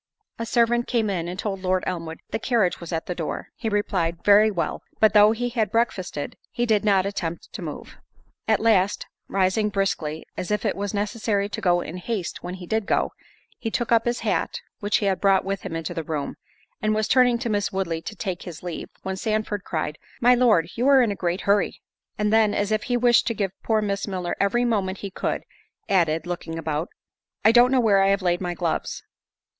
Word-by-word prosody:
A 230 - -3
servant 240 0 +2
came 225 -4 +1
in, 170 -3 -2
and 180 +1 -5
told 195 -1 -3
Lord 185 0 +1
Elmwood, 165 -2 -4
"The - - -1
carriage 225 -7 +1
was 170 - -8
at 165 -1 -2
the 180 - -3
door." 165 -3 -4
He 225 - -3
replied, 185 -5 -1
"Very 210 +1 +7
well." 175 -5 -2 0.2
But 220 -1 +5
though 210 0 +7
he 245 +2 -1
had 225 -4 0
breakfasted, 190 -10 -1
he 240 -1 -1
did 220 -3 +2
not 195 -3 +3
attempt 170 -4 -4
to - - -6
move. - - -7 0.5
At - - +3
last, 210 -3 +2 0.2
rising 195 +2 +1
briskly, 175 -6 -2
as 180 - -4
if 210 -1 -1
it - - +1
was 200 +1 -3
necessary 205 0 0
to - - -5
go 175 -2 +3
in 170 +2 -6
haste 185 0 -4
when 180 +1 -5
he 180 -1 -9
did 220 +2 -1
go; - - +1 0.5
he 230 - -2
took 235 +1 -2
up 230 -1 +4
his 240 0 -1
hat, - - -1 0.2
which 205 -1 +1
he 205 - -2
had 195 -1 0
brought 195 -2 +4
with 195 0 -2
him 165 - -5
into 165 +1 -3
the 165 -2 -3
room, 150 -2 -3 0.5
and 215 0 +1
was 215 0 0
turning 250 0 +4
to 235 0 -3
Miss 205 -1 0
Woodley 175 -4 -2
to 215 - -7
take 185 -3 -4
his 170 -3 -9
leave, 175 -2 -5
when 190 0 -3
Sandford 215 -1 -1
cried, 155 -2 -3 0.2
"My 245 +1 +6
Lord, 230 -10 +4
you 245 +3 0
are 270 -2 +7
in 225 - +1
a - - -2
great 175 0 -1
hurry." 200 0 +1 0.4
And 210 0 +1
then, 220 -2 +4
as 205 +1 0
if 215 0 0
he 245 - +1
wished 240 0 +4
to 230 - 0
give 195 -3 -1
poor 220 -1 +1
Miss 200 -1 -2
Milner 185 -3 -3
every 240 +5 +2
moment 200 -5 0
he 195 - -5
could, - - -2 0.4
added, 165 -4 +2
(looking 175 -2 -5
about) 155 0 -2 0.6
"I 220 - +8
don't 245 +2 +6
know 265 - +4
where 205 -5 +4
I 195 - +4
have 195 0 +2
laid 175 0 +1
my 175 -1 -2
gloves." 170 -2 -2
200 Hz, 220 wpm, -24 LUFS, 180-220 Hz, 0.6 s, I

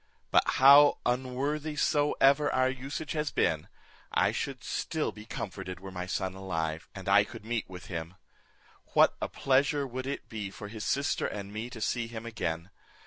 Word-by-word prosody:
But - - +6
how 140 +2 +8
unworthy 135 +5 -1
soever 145 -1 +3
our 130 0 +2
usage 135 +3 -5
has 150 -1 -1
been, 80 -2 0 0.4
I - - +3
should - - -4
be - - -13
still - - -2 0.2
comforted 95 -2 -5
were 95 0 -8
my 90 -1 -5
son 95 0 -2
alive, 80 -4 -3
and 95 -1 -8
I 100 +1 +6
could 100 - -10
meet 115 -3 -2
with 90 -1 -9
him. 85 0 -5 0.8
What - - +6
a - - 0
pleasure 140 +1 +2
would 130 0 -5
it 140 - -4
be 105 -3 -5
for 105 +1 -9
his 110 0 -6
sister 140 +1 0
and 100 0 -6
me 110 +3 -4
to 120 - -9
see 120 +1 -1
him 115 -1 -7
again! 85 -5 -3
115 Hz, 175 wpm, -30 LUFS, 95-135 Hz, 0.8 s, how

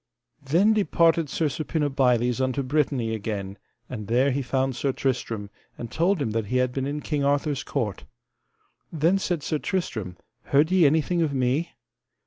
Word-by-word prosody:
Then 170 +10 +3
departed 170 -6 +2
Sir 160 - -1
Suppinabiles 135 -5 +1
unto 130 +1 0
Brittany 130 -4 0
again, 100 -2 -4 0.3
and 110 -5 -7
there 130 +5 +3
he 140 +2 -1
found 130 0 -1
Sir 135 +3 0
Tristram, 115 -6 -3 0.3
and 115 - -7
told 175 +3 +1
him 135 -6 -1
that 110 -1 -2
he 125 - 0
had 125 0 +1
been 135 +1 -2
in 145 +1 -3
King 145 -2 -2
Arthur's 140 0 0
court. 105 - -3 0.9
Then 170 +5 +2
said 175 -6 -2
Sir 155 - -1
Tristram: 110 - -3 0.3
Heard 150 +5 +3
ye 185 -5 +5
anything 160 +4 +1
of 150 -4 0
me? 130 +6 0
140 Hz, 160 wpm, -25 LUFS, 125-155 Hz, 0.9 s, ye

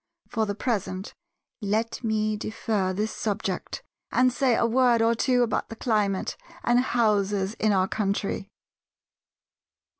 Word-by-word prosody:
For 220 -1 0
the 205 - -2
present 195 -4 -2 0.5
let 220 +4 -1
me 215 -1 +1
defer 210 -2 -1
this 210 +4 -1
subject, 200 -3 -3 0.3
and 255 -1 +3
say 250 -2 +2
a - - +2
word 240 0 +4
or 225 +1 +4
two 245 +2 +2
about 230 -3 -1
the 225 - -7
climate 210 -5 0 0.3
and 240 +1 +4
houses 210 -5 +1
in 215 - +3
our 190 -1 +3
country. 200 -1 -2
215 Hz, 130 wpm, -26 LUFS, 200-235 Hz, 0.5 s, word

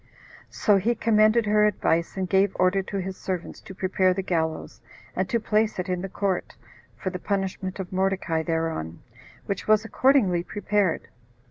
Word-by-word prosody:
So 205 -2 +3
he 230 +5 +1
commended 215 0 +3
her 210 0 +3
advice, 170 -4 0
and 190 -1 -1
gave 195 +1 +2
order 185 +2 +3
to 195 +1 -5
his 190 0 -4
servants 180 -2 -5
to 190 - -11
prepare 185 0 +1
the 195 - -2
gallows, 160 -3 -2 0.3
and - - -1
to 235 - +1
place 215 0 +1
it 180 +1 -3
in 180 -1 -1
the 195 - -5
court, 195 -1 -2 0.4
for 185 - -3
the 180 - -5
punishment 190 -1 -3
of 185 -1 -6
Mordecai 190 -3 0
thereon, 160 - -3 0.4
which 200 - -4
was 215 0 +4
accordingly 225 -7 +3
prepared. 205 -1 -1
190 Hz, 165 wpm, -25 LUFS, 180-210 Hz, 0.4 s, was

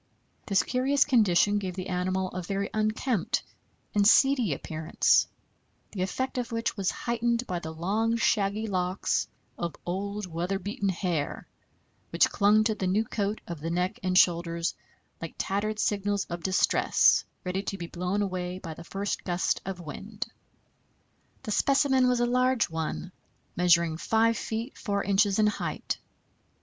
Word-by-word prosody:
This 195 -2 +3
curious 270 +3 +2
condition 205 -5 +3
gave 185 -3 -4
the 185 -1 -4
animal 185 +1 -1
a 185 - -4
very 195 +2 -3
unkempt 215 0 0 0.5
and 205 -1 +4
"seedy" 255 - +5
appearance, 155 +3 +2 0.6
the 195 - -4
effect 260 +7 -2
of 240 - -4
which 230 0 -1
was 195 -3 0
heightened 235 +1 -1
by 180 -5 -3
the 160 - -6
long, 210 +8 0
shaggy 210 -1 +1
locks 185 -2 0 0.3
of 170 -2 -3
old, 200 +3 -3
weather 175 +3 -2
beaten 200 +1 -2
hair 175 -5 -2 0.6
which - - +3
clung 210 +1 +4
to 220 0 +1
the 195 -3 -2
new 205 +5 +2
coat 205 0 -2
of 170 -3 -6
the 165 +3 -4
neck 180 +4 -1
and 185 0 +1
shoulders 170 -1 +2 0.5
like 165 - -6
tattered 210 +2 -1
signals 205 -1 0
of 175 0 -4
distress, 190 +2 +3 0.2
ready 185 +1 -2
to 195 0 -4
be 175 - -5
blown 180 +4 -2
away 180 -2 -3
by 165 -4 -7
the 170 - -11
first 195 +3 -3
gust 175 -1 0
of 190 -2 -4
wind. 205 +7 -6 1.2
This 215 -4 -1
specimen 270 -2 +3
was 250 -1 +2
a - - +4
large 250 -3 +2
one, 160 +3 -3 0.4
measuring 170 -2 +3
5 225 +5 +2
feet 225 +4 -4
4 200 -2 -1
inches 200 0 +2
in 215 - +4
height. 210 - -2
195 Hz, 155 wpm, -28 LUFS, 180-220 Hz, 1.2 s, seedy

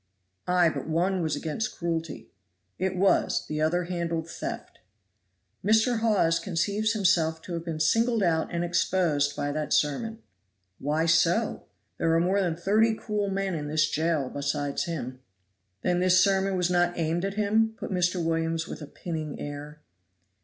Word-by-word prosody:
"Ay, 180 -1 +4
but 160 - -3
one 180 +4 +1
was 155 -3 0
against 160 +9 -3
cruelty." 165 -2 -3 0.5
"It 185 0 -1
was; 195 +1 +2
the 155 0 -3
other 175 +3 +1
handled 170 -2 -3
theft." - - -6 0.8
"Mr. 220 +3 +3
Hawes 200 -7 +2
conceives 200 +4 0
himself 175 -6 +2
to 180 - -7
have 165 -1 -3
been 165 -2 -4
singled 225 +7 +2
out 160 -3 +1
and 170 0 -1
exposed 170 -5 +1
by 145 0 -2
that 150 +1 -2
sermon." 220 +10 0 0.6
"Why 150 +3 0
so? 170 +6 +2 0.3
there 165 0 +2
are - - +4
more 190 +4 +2
than 175 -4 0
thirty 215 +6 +2
cruel 210 -2 -2
men 195 -1 -1
in 150 -3 -3
this 155 +1 +2
jail 155 -4 0
besides 145 0 -2
him." 130 -7 -5 0.6
"Then 180 0 +1
this 185 0 +4
sermon 195 0 +2
was 180 0 +1
not 175 0 +2
aimed 165 +1 0
at 195 0 -2
him?" 220 +1 +2
put - - -6
Mr. 180 -1 0
Williams 165 0 -1
with - - -7
a 150 - -7
pinning 155 -1 -5
air. 145 +1 -7
170 Hz, 160 wpm, -27 LUFS, 160-195 Hz, 0.8 s, Ay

